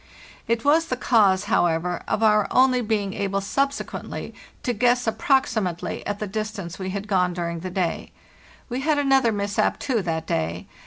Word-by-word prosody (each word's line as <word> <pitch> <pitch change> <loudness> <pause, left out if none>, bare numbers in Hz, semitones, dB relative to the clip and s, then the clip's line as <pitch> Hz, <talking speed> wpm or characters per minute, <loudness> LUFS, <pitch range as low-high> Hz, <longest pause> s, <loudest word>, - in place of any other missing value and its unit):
It 230 +1 0
was 320 +3 +4
the 255 - -2
cause, 205 -7 +3
however, 175 +1 +1
of 225 - 0
our 210 -2 +4
only 255 -1 +4
being 210 -4 -1
able 195 0 -1
subsequently 275 +8 -3 0.3
to 245 - 0
guess 245 +2 +2
approximately 220 - 0
at 205 - -2
the 210 - -3
distance 205 -3 -5
we 190 0 -3
had 200 +2 -4
gone 180 -3 +2
during 170 -1 -3
the 185 +3 -5
day. 180 -2 -2 0.6
We 250 0 -3
had 305 +1 +1
another 270 -4 +3
mishap, 200 -1 0
too, 250 -6 -1
that 165 -3 -2
day. 85 - -2
210 Hz, 165 wpm, -24 LUFS, 185-245 Hz, 0.6 s, was